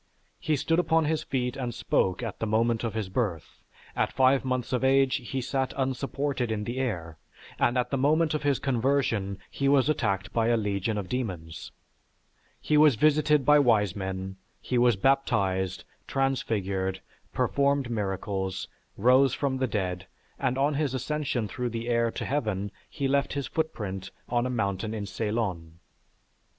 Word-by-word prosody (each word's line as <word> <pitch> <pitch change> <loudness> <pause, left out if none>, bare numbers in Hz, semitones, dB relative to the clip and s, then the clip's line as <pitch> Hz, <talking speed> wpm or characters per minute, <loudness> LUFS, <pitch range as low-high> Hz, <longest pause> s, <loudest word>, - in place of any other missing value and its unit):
He 155 - 0
stood 165 +4 +1
upon 165 -2 +2
his 155 0 0
feet 125 -4 -2
and 125 -4 -4
spoke 95 -3 0
at 115 - -5
the 115 - -1
moment 115 +2 +1
of 115 -2 -3
his 110 -3 -2
birth; 95 -5 -3 0.3
at - - +1
five 130 +1 +3
months 130 -1 -2
of 125 - 0
age 135 0 +4
he 130 0 -4
sat 130 +1 -2
unsupported 135 -1 -1
in 105 -1 -2
the 120 +4 -4
air; 85 -11 -3 0.4
and 120 - +2
at 125 -1 0
the 135 - 0
moment 155 +3 +3
of 155 - -1
his 145 -3 +2
conversion 120 -6 0
he 140 0 0
was 140 0 +4
attacked 100 -10 -1
by 115 -1 +2
a 120 0 +3
legion 105 0 -1
of 100 -3 -3
demons. 90 -9 -4 0.9
He 150 - +1
was 150 -4 +6
visited 150 +1 +3
by 150 0 +6
wise 110 -8 +3
men, 95 -1 -4 0.2
he 125 - -1
was 120 -2 +4
baptized, 95 -6 +1 0.2
transfigured, 100 -8 -1 0.3
performed 140 -3 +1
miracles, 95 -3 -2 0.3
rose 130 +4 +4
from 135 -2 -1
the 130 0 0
dead, 95 -4 -3 0.3
and 130 -1 0
on 140 +2 +2
his 140 -2 -1
ascension 135 -4 -2
through 125 +5 -3
the 115 +1 -4
air 115 -1 +2
to - - -5
heaven, 110 -8 -1 0.2
he 140 -3 -2
left 140 +1 +1
his 140 -1 -2
footprint 100 - -3 0.2
on 120 +1 0
a - - -3
mountain 105 -2 -2
in 105 -2 -4
Ceylon. 95 -6 -3
120 Hz, 165 wpm, -27 LUFS, 100-135 Hz, 0.9 s, was